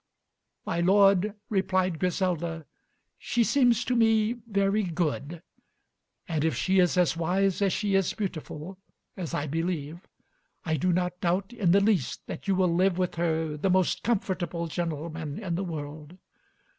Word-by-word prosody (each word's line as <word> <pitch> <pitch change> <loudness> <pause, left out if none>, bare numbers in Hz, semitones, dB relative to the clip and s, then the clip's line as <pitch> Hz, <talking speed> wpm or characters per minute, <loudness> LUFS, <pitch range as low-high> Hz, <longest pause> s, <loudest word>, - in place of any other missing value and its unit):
"My 170 - -1
lord," 195 +2 +4
replied 185 -4 0
Griselda, 170 -3 -1 0.5
"she 240 - +1
seems 240 -2 +3
to 250 - 0
me 225 -1 +3
very 200 0 +1
good, 165 -2 -3 0.8
and 160 -3 -1
if 160 -4 +1
she 190 +8 +2
is 180 0 +3
as 180 -2 +3
wise 185 +4 0
as 195 -1 +3
she 205 +1 -1
is 195 -2 +2
beautiful, 185 -2 -6 0.4
as 180 -5 -4
I 145 - -1
believe, 165 +1 -3 0.6
I 160 -2 +1
do 180 +3 +1
not 180 0 -1
doubt 190 +5 0
in 210 -7 0
the 195 +3 +5
least 195 - 0
that - - -8
you 195 - +2
will 185 -2 +2
live 185 +1 +2
with 180 -1 0
her 160 -2 -1
the 165 +6 -1
most 185 -1 +2
comfortable 185 -6 -1
gentleman 160 -2 -4
in 190 -6 -4
the 180 +4 -1
world. 155 -1 -7
180 Hz, 155 wpm, -27 LUFS, 165-195 Hz, 0.8 s, the